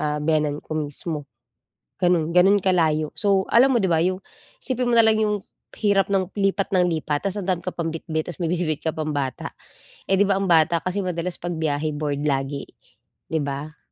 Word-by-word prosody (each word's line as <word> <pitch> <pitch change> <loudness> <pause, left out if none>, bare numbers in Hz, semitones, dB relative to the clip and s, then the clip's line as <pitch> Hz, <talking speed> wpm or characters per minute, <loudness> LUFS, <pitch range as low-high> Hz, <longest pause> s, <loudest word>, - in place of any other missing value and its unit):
ah, 150 0 -1
biyenan 150 -1 +1
ko 155 - -4
mismo. 150 0 -3 0.8
Gano'n, 170 -2 +2
gano'n 195 +3 +6
kalayo. 160 -5 +2
So, 195 -2 +3
alam 260 +3 +6
mo 235 - +4
'di - - +3
ba 160 - +3
'yung, 185 +1 0 0.4
isipin 255 -2 -1
mo - - +1
na 230 - +7
lang 220 - +4
'yung 210 -1 +1 0.4
hirap 200 -2 +3
ng 190 -1 0
lipat 195 -1 0
ng 180 -1 +4
lipat, 155 +1 -1
tapos 195 +2 -3
ang 185 - -7
dami 175 -2 0
ka 185 - -3
pang 165 -1 -2
bitbit 160 -1 -4
tapos - - -11
may 165 - 0
bitbit 165 -4 -1
ka 160 - 0
pang 155 -1 -2
bata, 135 -3 -3 0.6
eh 195 - +4
'di 200 - +4
ba 200 - +2
ang 195 -2 -1
bata 165 0 +4
kasi 185 +2 -2
madalas 180 -1 -3
'pag 175 0 -4
biyahe 155 -1 -1
bored 145 -1 -2
lagi, 140 0 -1 0.6
'di 160 - +1
ba? 145 +2 -5
170 Hz, 205 wpm, -23 LUFS, 155-195 Hz, 0.8 s, na